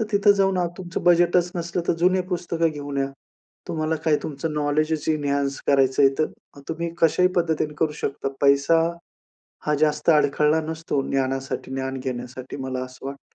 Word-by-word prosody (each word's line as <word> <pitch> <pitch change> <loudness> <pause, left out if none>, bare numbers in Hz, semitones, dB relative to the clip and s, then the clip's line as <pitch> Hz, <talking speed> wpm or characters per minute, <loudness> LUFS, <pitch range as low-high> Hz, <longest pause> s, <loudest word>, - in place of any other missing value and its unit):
तर - - +1
तिथे 205 0 +5
जाऊन 195 -1 +2
आज 175 -1 +1
तुमचं 175 -2 -5
बजेटच 175 0 +4
नसलं, 170 +1 -2
तर - - +5
जुनी 185 +1 +4
पुस्तकं 170 -2 0
घेऊन 145 -2 -6
या. 135 0 0 0.6
तुम्हाला 155 0 -1
काय 155 -2 +4
तुमचं 155 +2 -4
नॉलेजच 150 +1 0
इन्हांन्स 140 -2 0
करायचं 135 0 +3
आहे. 135 - +7
तर 155 -2 -4
तुम्ही 170 +1 -2
कशाही 180 +3 +4
पद्धतीने 160 -3 0
करू 155 -2 +1
शकता. 135 - -2
पैसा 140 +3 +4 0.9
हा 150 - +1
जास्त 155 +2 +2
अडखळला 150 +1 +3
नसतो 160 -2 -2
ज्ञानासाठी, 135 0 -2
ज्ञान 130 0 -3
घेण्यासाठी 125 0 -6
मला 130 -1 -3
असं 130 +1 -11
वाटते. 140 0 -9
150 Hz, 160 wpm, -23 LUFS, 140-170 Hz, 0.9 s, आहे